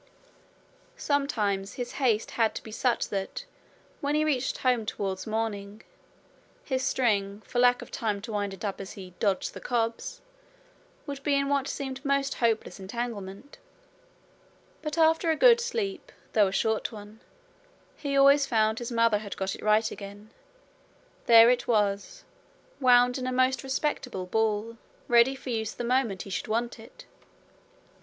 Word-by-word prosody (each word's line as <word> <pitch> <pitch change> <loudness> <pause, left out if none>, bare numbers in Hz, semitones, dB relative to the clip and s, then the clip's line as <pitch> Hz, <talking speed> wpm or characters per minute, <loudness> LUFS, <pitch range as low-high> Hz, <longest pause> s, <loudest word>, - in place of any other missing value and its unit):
Sometimes 210 -9 -1
his 245 -1 -5
haste 225 -4 +1
had 225 -2 +1
to - - -6
be 220 - -10
such 240 +2 0
that, 200 - -4 0.5
when 290 +1 -1
he 305 0 +2
reached 270 -4 0
home 250 -3 +1
towards 195 -2 -4
morning, 215 -1 -3 0.8
his 260 -2 -1
string, 205 -6 0
for 245 - -3
lack 245 0 +4
of - - -14
time 210 -3 -2
to 225 - -6
wind 205 -1 -2
it 195 +2 -7
up 200 -1 -3
as 195 - -8
he 185 -4 -10
'dodged 200 -3 0
the - - -8
cobs', 235 - -2 0.9
would 280 -2 -6
be 285 0 +1
in 280 0 +1
what 280 -1 +1
seemed 265 -1 -5
most 275 -1 +1
hopeless 225 -3 -1
entanglement; 205 +3 -6 1.2
but 305 +1 -4
after 325 +1 +3
a 320 - +3
good 475 +6 +6
sleep, 460 -1 -3 0.2
though 210 -2 +5
a - - -3
short 220 +3 0
one, 210 0 -11 0.8
he 280 -2 -2
always 280 +1 +6
found 220 -2 +2
his 240 0 -5
mother 230 -2 +3
had 205 -1 -7
got 190 0 -2
it - - -9
right 215 +1 +2
again. 205 +1 -10 1.0
There 230 0 +8
it 245 -1 -1
was, 205 -3 0 0.6
wound 250 0 +5
in 255 - -3
a - - -1
most 255 +1 +2
respectable 265 -7 -2
ball, 220 +3 -1 0.3
ready 240 +3 +5
for 265 -1 -7
use 220 -2 -2
the - - -5
moment 235 -6 0
he 195 - -10
should - - -3
want 235 +2 -2
it! 230 - -14
235 Hz, 160 wpm, -27 LUFS, 210-270 Hz, 1.2 s, There